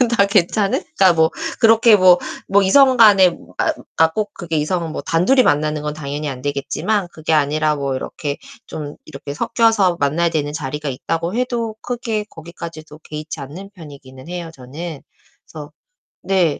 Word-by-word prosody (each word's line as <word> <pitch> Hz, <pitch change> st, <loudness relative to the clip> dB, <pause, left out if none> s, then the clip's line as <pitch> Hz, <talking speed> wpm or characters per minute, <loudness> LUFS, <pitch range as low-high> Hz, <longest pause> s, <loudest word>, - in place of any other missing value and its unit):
다 200 Hz, -3 st, +4 dB
괜찮은? 200 Hz, 0 st, +1 dB, 0.2 s
그러니까 185 Hz, -3 st, +6 dB
뭐 160 Hz, 0 st, +3 dB, 0.3 s
그렇게 225 Hz, 0 st, +6 dB
뭐 185 Hz, -2 st, +6 dB, 0.3 s
뭐 200 Hz, +1 st, +4 dB
이성 260 Hz, +7 st, +5 dB
간에 200 Hz, -6 st, +6 dB, 0.6 s
아 160 Hz, -, +6 dB
꼭 210 Hz, -1 st, -3 dB
그게 165 Hz, -2 st, -5 dB
이성은 165 Hz, +2 st, -1 dB
뭐 -, -, -5 dB
단둘이 180 Hz, +12 st, +3 dB
만나는 150 Hz, -4 st, +1 dB
건 150 Hz, 0 st, -3 dB
당연히 145 Hz, 0 st, -4 dB
안 130 Hz, -2 st, -7 dB
되겠지만 150 Hz, +8 st, -1 dB
그게 160 Hz, 0 st, -2 dB
아니라 150 Hz, +1 st, +2 dB
뭐 140 Hz, -2 st, -2 dB
이렇게 145 Hz, +2 st, -5 dB, 0.3 s
좀 145 Hz, -2 st, -7 dB
이렇게 140 Hz, -1 st, -8 dB
섞여서 215 Hz, -1 st, +2 dB
만나야 155 Hz, +5 st, +1 dB
되는 150 Hz, -2 st, -2 dB
자리가 150 Hz, 0 st, -4 dB
있다고 165 Hz, +6 st, -3 dB
해도 240 Hz, -3 st, -2 dB
크게 230 Hz, -3 st, -3 dB
거기까지도 160 Hz, -2 st, -10 dB
개의치 155 Hz, +1 st, -7 dB
않는 165 Hz, +9 st, -9 dB
편이기는 140 Hz, -5 st, -13 dB
해요, 175 Hz, -2 st, -6 dB
저는. 145 Hz, +4 st, -8 dB, 0.4 s
그래서 150 Hz, -2 st, -10 dB, 0.5 s
네. 185 Hz, -6 st, +1 dB
165 Hz, 340 characters per minute, -19 LUFS, 150-195 Hz, 0.6 s, 그러니까